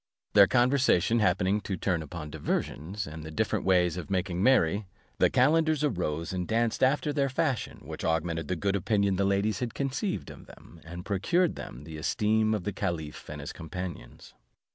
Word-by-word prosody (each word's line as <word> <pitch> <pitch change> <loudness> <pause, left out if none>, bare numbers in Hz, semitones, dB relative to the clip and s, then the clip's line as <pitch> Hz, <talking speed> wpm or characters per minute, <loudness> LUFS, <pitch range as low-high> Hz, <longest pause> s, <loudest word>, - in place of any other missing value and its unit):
Their 100 -1 +8
conversation 120 -4 +3
happening 105 -1 +2
to 95 -2 -4
turn 85 -2 0
upon 75 0 -7
diversions, 95 +8 -3
and 80 +1 -8
the 80 - -7
different 75 - -1
ways 90 -2 +3
of 90 - -6
making 90 -2 -1
merry; 100 -5 +3 0.3
the - - +5
calenders 155 +3 +3
arose, 85 - -1
and 90 -1 -2
danced 115 0 0
after 145 +3 +2
their 140 -1 +1
fashion, 130 -2 -1
which - - -7
augmented 80 0 -1
the 90 - -1
good 100 +3 0
opinion 100 0 +1
the 100 - +2
ladies 100 +1 +1
had 120 -2 -4
conceived 140 +8 -2
of - - -13
them, 85 - -15
and 85 +2 -8
procured 160 - +1
them 65 - -8
the 80 0 -8
esteem 110 +6 +1
of 105 - -4
the 105 - -3
caliph 85 -6 -4
and 75 -1 -6
his 70 - -6
companions. 85 -7 -8
100 Hz, 180 wpm, -28 LUFS, 85-115 Hz, 0.3 s, Their